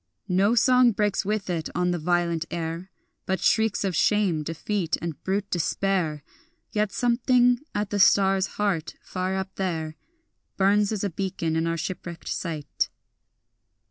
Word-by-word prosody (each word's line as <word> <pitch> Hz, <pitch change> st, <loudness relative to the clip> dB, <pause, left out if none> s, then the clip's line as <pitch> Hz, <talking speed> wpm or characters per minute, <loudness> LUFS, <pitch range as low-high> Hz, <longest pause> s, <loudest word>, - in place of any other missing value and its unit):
No 195 Hz, +5 st, +3 dB
song 250 Hz, -1 st, +5 dB
breaks 205 Hz, 0 st, 0 dB
with 210 Hz, -1 st, -1 dB
it 170 Hz, -3 st, -2 dB
on 180 Hz, 0 st, +1 dB
the 175 Hz, -, -1 dB
violent 170 Hz, 0 st, 0 dB
air, 170 Hz, +2 st, -4 dB, 0.4 s
But 190 Hz, -1 st, 0 dB
shrieks 220 Hz, +2 st, +2 dB
of 190 Hz, -3 st, -1 dB
shame, 195 Hz, -4 st, +2 dB
defeat, 165 Hz, +3 st, -2 dB
and 165 Hz, -3 st, -6 dB
brute 200 Hz, +1 st, -2 dB
despair; 175 Hz, -3 st, 0 dB, 0.5 s
Yet 210 Hz, -2 st, 0 dB
something 245 Hz, +1 st, +3 dB, 0.2 s
at 205 Hz, -1 st, -1 dB
the 205 Hz, -, 0 dB
star's 195 Hz, -1 st, +4 dB
heart 195 Hz, -6 st, -1 dB
far 185 Hz, +1 st, -3 dB
up 190 Hz, 0 st, -4 dB
there 160 Hz, -5 st, -2 dB, 0.6 s
Burns 200 Hz, +2 st, +3 dB
as 210 Hz, -2 st, -2 dB
a 200 Hz, -, -1 dB
beacon 175 Hz, -3 st, -2 dB
in 165 Hz, +1 st, +1 dB
our 165 Hz, 0 st, -1 dB
shipwrecked 170 Hz, 0 st, -6 dB
sight. 160 Hz, -4 st, -2 dB
190 Hz, 145 wpm, -25 LUFS, 170-205 Hz, 0.6 s, song